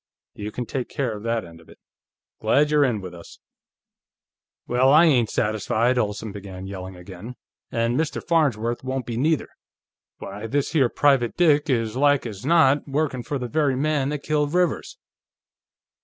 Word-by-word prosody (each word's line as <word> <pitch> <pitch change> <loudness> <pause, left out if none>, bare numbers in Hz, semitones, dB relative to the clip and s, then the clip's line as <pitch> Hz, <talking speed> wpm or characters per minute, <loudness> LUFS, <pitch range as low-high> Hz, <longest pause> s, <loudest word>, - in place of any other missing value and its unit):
"You 105 0 -6
can 125 - -4
take 125 +1 -4
care 130 -7 -2
of 105 - -8
that 115 -3 -1
end 85 -1 -14
of 80 - -21
it. - - -16 0.6
Glad 150 +1 +2
you're 150 -1 +4
in 120 -7 0
with 90 -2 -8
us." 85 -1 -12 1.3
"Well, 125 +2 +3
I 155 +4 +7
ain't 125 -9 +3
satisfied!" 110 +4 0
Olsen 105 -1 -2
began 95 -2 -8
yelling, 95 -1 -7
again. 95 +6 -10 0.4
"And 115 +3 0
Mr. 160 -2 -1
Farnsworth 120 -9 +1
won't 130 -1 -3
be, 115 - -4
neither. 150 +6 0 0.7
Why, 100 +3 -7
this 140 +4 -1
here 140 -7 +3
private 135 -5 +2
dick 155 -3 +3
is 115 -3 0
like 145 0 +3
as 105 -4 -7
not 145 -2 +3
workin' 140 -2 -1
for 140 +4 -3
the 125 -2 -4
very 145 0 +1
man 140 0 0
that 145 -1 -4
killed 150 +1 0
Rivers!" 180 - 0
125 Hz, 170 wpm, -23 LUFS, 110-145 Hz, 1.3 s, I